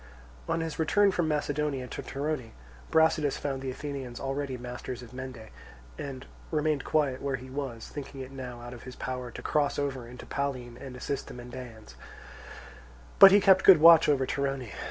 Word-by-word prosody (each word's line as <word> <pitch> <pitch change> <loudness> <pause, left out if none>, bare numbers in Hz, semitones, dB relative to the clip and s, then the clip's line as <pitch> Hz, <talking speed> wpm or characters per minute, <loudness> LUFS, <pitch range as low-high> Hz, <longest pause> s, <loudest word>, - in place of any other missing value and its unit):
On 165 - +1
his 165 -1 -4
return 200 +5 +4
from 175 -3 0
Macedonia 150 -3 -1
to - - -5
Torone, 140 -4 -4 0.4
Brasidas 160 -3 +3
found 135 -2 -3
the 135 - -4
Athenians 135 -2 -6
already 135 -1 -3
masters 125 0 -7
of 120 - -13
Mende, 125 -4 -8 0.5
and 135 - -7 0.2
remained 155 -2 0
quiet 140 -4 0
where 140 -1 -1
he 130 +1 -9
was, 130 -5 -5
thinking 140 -2 -8
it 130 0 -8
now 125 -3 -7
out 120 +1 -8
of 120 - -10
his 125 - -10
power 125 -1 -4
to - - -9
cross 145 -2 +1
over 135 -4 -3
into 125 +1 -10
Pallene 130 -4 -3
and 130 -2 -8
assist 140 +2 -4
the - - -9
Mendaeans, 120 - -10 1.3
but 195 - +12
he 200 - +7
kept 190 -1 +5
good 190 - +9
watch 165 0 +8
over 135 -3 +3
Torone. 135 -4 -2
135 Hz, 175 wpm, -29 LUFS, 125-150 Hz, 1.3 s, but